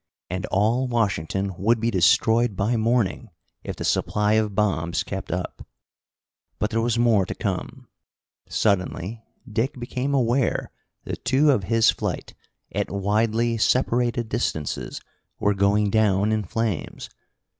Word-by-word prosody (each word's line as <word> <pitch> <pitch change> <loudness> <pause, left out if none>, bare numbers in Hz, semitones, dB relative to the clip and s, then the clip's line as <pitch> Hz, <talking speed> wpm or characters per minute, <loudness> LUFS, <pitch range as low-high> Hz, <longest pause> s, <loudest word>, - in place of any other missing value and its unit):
And 95 +3 -3
all 115 +6 +1
Washington 100 -5 -1
would 115 +4 +2
be 115 +1 0
destroyed 110 +4 +3
by 105 +6 0
morning, 115 0 0 0.3
if - - -5
the - - -5
supply 105 0 +1
of 110 -2 +1
bombs 85 -5 0
kept 95 -1 -6
up. 90 0 -4 0.9
But 105 - -1
there 115 +1 +1
was 120 0 0
more 115 -4 +4
to - - -4
come. - - -4 0.6
Suddenly 100 +1 -1 0.2
Dick 120 +4 -2
became 130 +3 -2
aware 125 0 +1 0.3
that - - -6
two 135 +4 +4
of 105 -9 0
his 115 +3 +4
flight, - - -4 0.4
at - - -2
widely 110 +4 0
separated 120 0 +1
distances, 80 -8 -3 0.4
were 105 - +2
going 100 +1 +2
down 105 -1 +2
in 110 -2 0
flames. 110 -1 -3
110 Hz, 135 wpm, -24 LUFS, 100-120 Hz, 0.9 s, more